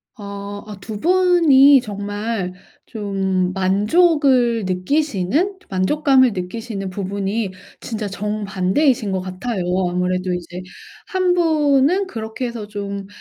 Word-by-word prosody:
어 200 -1 -7
어 205 -2 -9
2 210 +2 -7
분이 330 -7 +5
정말 205 -2 -4 0.3
좀 190 -4 -1
만족을 235 - +3
느끼시는, 285 - 0
만족감을 260 +5 +3
느끼시는 195 +1 -5
부분이 200 +2 -3 0.3
진짜 215 -3 -4
정반대이신 205 +3 0
것 190 -1 -1
같아요. 185 +2 -4 0.3
아무래도 180 +1 -1
이제 180 +1 -6 0.5
1 370 -1 +1
분은 315 +1 +2
그렇게 225 -5 -5
해서 230 -3 -5
좀 200 -1 -5
210 Hz, 225 characters per minute, -20 LUFS, 190-270 Hz, 0.5 s, 분이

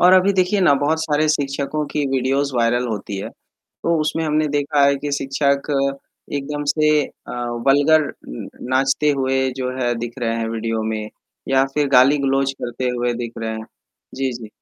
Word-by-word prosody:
और 180 +1 +7
अभी 185 +2 +5
देखिए 190 +2 +2
ना, 175 - +5
बहुत 145 +3 +1
सारे 155 0 +1
शिक्षकों 145 0 -1
की 150 - 0
वीडियोज़ 135 +1 0
वायरल 120 +1 +2
होती 105 -3 -4
है, 95 - -5 0.4
तो 170 0 -2
उसमें 160 +1 -1
हमने 155 0 +1
देखा 145 0 +2
है 140 - +4
कि 145 +1 -4
शिक्षक 140 0 0 0.7
एकदम 145 +1 -4
से 155 +1 +3
अ, - - -12 0.4
वल्गर 145 +3 +5 0.3
उम, - - -7 0.3
नाचते 135 +3 +2
हुए 130 0 +1
जो 130 -1 -2
है 120 -1 +1
दिख 120 0 -5
रहे 115 -2 -1
हैं 115 -1 -2
वीडियो 115 0 -2
में, 110 -1 -3 0.4
या 135 0 +4
फिर 150 -1 +1
गाली-गलौज 135 +1 +4
करते 125 +1 -2
हुए 120 0 0
दिख 115 - -7
रहे 115 -1 -3
हैं। 110 - -7 0.5
जी, 135 -1 -1
जी। 115 -3 -8
135 Hz, 175 wpm, -20 LUFS, 120-150 Hz, 0.7 s, और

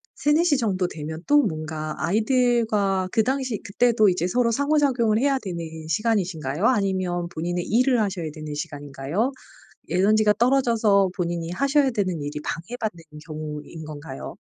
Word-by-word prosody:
3:00-4:00 300 +1 +3
정도 195 -7 0
되면 160 0 -6
또 290 +1 +5
뭔가 155 -3 -3
아이들과 215 -3 +1
그 220 - +3
당시 260 -4 -1
그때도 215 0 +3
이제 175 -2 0
서로 235 +5 +2
상호작용을 265 -5 +2
해야 275 +1 +2
되는 185 -8 -5 0.3
시간이신가요? 180 - -1
아니면 185 -7 +1
본인의 175 +1 -3
일을 250 +1 +3
하셔야 185 -7 -2
되는 155 -2 -7
시간인가요? 145 - -3 0.6
에너지가 210 +3 +3
떨어져서 230 -6 +3
본인이 170 -2 -2
하셔야 275 +6 +2
되는 185 -8 -1
일이 145 +1 -4
방해받는 175 0 -4 0.2
경우인 155 0 -7
건가요? 145 -2 -8
195 Hz, 340 characters per minute, -24 LUFS, 165-240 Hz, 0.6 s, 또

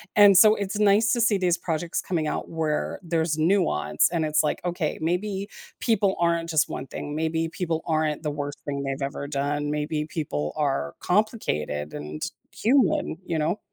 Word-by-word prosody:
and 205 -2 +8
so 215 +2 +8
it's 200 +1 -3
nice 210 +2 +4
to 235 - +1
see 220 -4 +3
these 180 -2 +1
projects 165 0 -2
coming 165 -4 -1
out - - -3
where 160 -2 -2
there's 160 -2 0
nuance 155 - +2
and 165 -2 0
it's 155 0 +2
like, 150 - 0
"Okay, 175 -3 -1
maybe 190 +4 -1 0.3
people 200 -4 +2
aren't 170 -1 +1
just 160 -1 +3
one 130 - -6
thing, 145 - -6
maybe 160 +1 -1
people 165 -2 -2
aren't 155 -1 0
the 150 - -1
worst 145 0 -4
thing 140 -1 -3
they've 135 +1 -3
ever 140 0 -5
done. 145 +1 -1
Maybe 150 +1 -1
people 75 - -3
are 135 - -1
complicated 75 - -1
and 75 +1 -6 0.3
human,” 235 - +2
you 165 - -1
know. 165 +6 0
160 Hz, 175 wpm, -25 LUFS, 145-190 Hz, 0.3 s, and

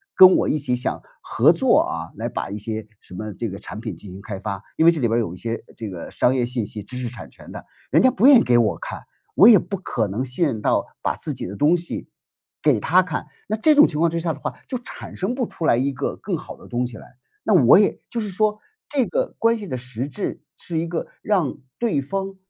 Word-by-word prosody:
跟 185 0 +9
我 - - +1
一 - - +1
起 130 -4 0
想 125 - -2 0.2
合 - - +4
作 - - +4
啊， - - -4
来 - - -3
把 - - -4
一 100 - -5
些 110 0 -5
什 - - -16
么 110 +3 -5
这 115 - -3
个 100 -2 -6
产 105 - -8
品 110 -5 -5
进 100 - -10
行 95 - -9
开 100 -1 -6
发。 100 -1 -5
因 160 - +4
为 - - +9
这 165 - -3
里 120 - +2
边 115 +1 +1
有 105 -7 -2
一 90 - -10
些 115 +2 -4
这 110 -2 -6
个 85 -2 -7
商 125 - +2
业 125 - +1
信 120 -2 -2
息， 105 +1 -6
知 125 +5 -8
识 125 -1 -3
产 120 0 -9
权 - - -14
的， - - -9 0.3
人 - - +5
家 260 - +6
不 245 - +1
愿 280 -4 +9
意 - - +2
给 120 -1 +3
我 110 -3 +2
看， - - -7 0.3
我 200 - +8
也 230 -3 +9
不 195 - -5
可 120 - -2
能 110 +7 -3
信 130 +7 0
任 115 - -3
到 - - +1 0.2
把 - - 0
自 - - -4
己 - - -4
的 100 - -7
东 150 - +3
西， 170 0 -6 0.6
给 145 -7 +4
他 175 - +4
看。 170 -3 -4 0.2
那 215 - 0
这 300 +8 +4
种 295 - +8
情 150 - -4
况 170 +1 +4
之 170 +1 -2
下 165 -1 -1
的 145 - -11
话， - - -4
就 260 - -4
产 240 - -9
生 195 +7 -2
不 250 -2 -1
出 165 - -5
来 115 - +4
一 135 +3 +1
个 135 +1 -3
更 195 - -3
好 - - -10
的 - - -15
东 125 0 -1
西 115 - -10
来。 125 - -15 0.3
那 215 - +2
我 125 - +8
也 205 - +2
就 235 - -3
是 210 - -4
说 210 +2 0 0.3
这 275 -4 +1
个 - - -1
关 230 +1 +3
系 210 - -7
的 130 - -3
实 125 +1 -5
质 195 +8 -5
是 170 - -5
一 160 - 0
个 165 -1 -3
让 185 -11 0 0.2
对 230 -11 +1
方 195 +7 -4
140 Hz, 290 characters per minute, -22 LUFS, -, 0.6 s, 跟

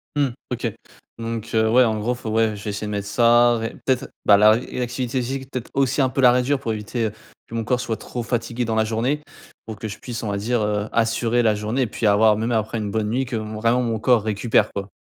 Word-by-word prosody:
Mmh. 145 -1 +2 0.2
OK 120 -3 -2 0.5
donc 115 -1 -4
heu, 110 0 +3
ouais, 125 +2 +6
en 110 -2 0
gros, 120 +4 -1
faut 115 - -6
ouais, 110 -1 +1
je 100 - -10
vais 105 - -3
essayer 105 +1 -4
de - - -4
mettre 100 -1 -3
ça 120 +1 +4
ré 115 0 -3
peut-être, 130 0 +1 0.2
bah, 100 -1 +7
laré 110 +3 +5
une 125 - -3
activité 125 +1 -2
physique, 135 +2 -5
peut-être 125 -2 -5
aussi, 135 0 +1
un 130 - +4
peu 135 +1 -1
la 125 -1 +7
réduire 125 +3 +1
pour 115 - -2
éviter, 110 +2 -2
heu, - - -5 0.3
que 115 - -9
mon 115 - -2
corps 125 +3 +1
soit 110 -3 -3
trop 120 +2 -6
fatigué 120 0 -2
dans 115 -1 -1
la 110 0 +2
journée, 120 +7 -1 0.4
pour 110 - -6
que 110 +2 -5
je 105 - -8
puisse, 115 -2 -6
on 105 - -2
va 100 - -1
dire, 115 +3 0
heu, 105 0 -1
assurer 115 +1 +1
la 110 -2 +3
journée, 110 +4 -1
puis, 110 - -4
avoir 105 +1 +5
même 115 +2 -1
après 110 +1 -1
une 105 -2 -3
bonne 105 0 -1
nuit 130 +4 0
que 125 -2 -5
m 110 0 -4
vraiment 115 +3 +2
mon 115 -3 -1
corps 120 -2 +3
récupère, 110 0 +1
quoi. 100 0 -5
115 Hz, 260 wpm, -22 LUFS, 110-125 Hz, 0.5 s, bah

